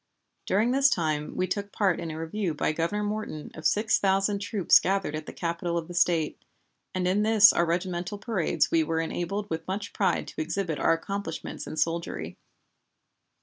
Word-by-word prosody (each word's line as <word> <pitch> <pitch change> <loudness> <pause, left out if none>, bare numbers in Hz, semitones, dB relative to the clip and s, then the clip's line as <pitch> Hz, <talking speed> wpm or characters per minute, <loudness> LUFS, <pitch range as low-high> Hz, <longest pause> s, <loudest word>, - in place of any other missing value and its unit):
During 215 +5 +2
this 275 +2 +5
time 155 - -1
we 185 - +1
took 200 +2 -3
part 195 -5 +1
in 165 - -4
a 155 0 -5
review 165 +1 -2
by 150 - 0
Governor 170 +7 -1
Morton 210 -7 -4
of 160 - 0
six 220 +1 +2
thousand 195 +1 +2
troops 205 -3 +4
gathered 190 -5 -1
at 155 0 -6
the - - -5
Capital 170 0 -2
of 165 -1 -3
the 175 - -8
State, 170 -3 +1 0.5
and 180 -1 0
in 190 +3 +2
this 215 -1 +7
and - - -2
our 170 - +3
regimental 175 +3 -2
parades 200 -5 0
we 165 -1 +4
were 160 +1 -1
enabled 175 +5 -3
with 160 0 -3
much 200 +2 -4
pride 195 - 0
to - - -5
exhibit 165 0 -2
our - - +4
accomplishments 165 0 -5
in 155 - -6
soldiery. 165 - -2
180 Hz, 190 wpm, -27 LUFS, 165-205 Hz, 0.5 s, this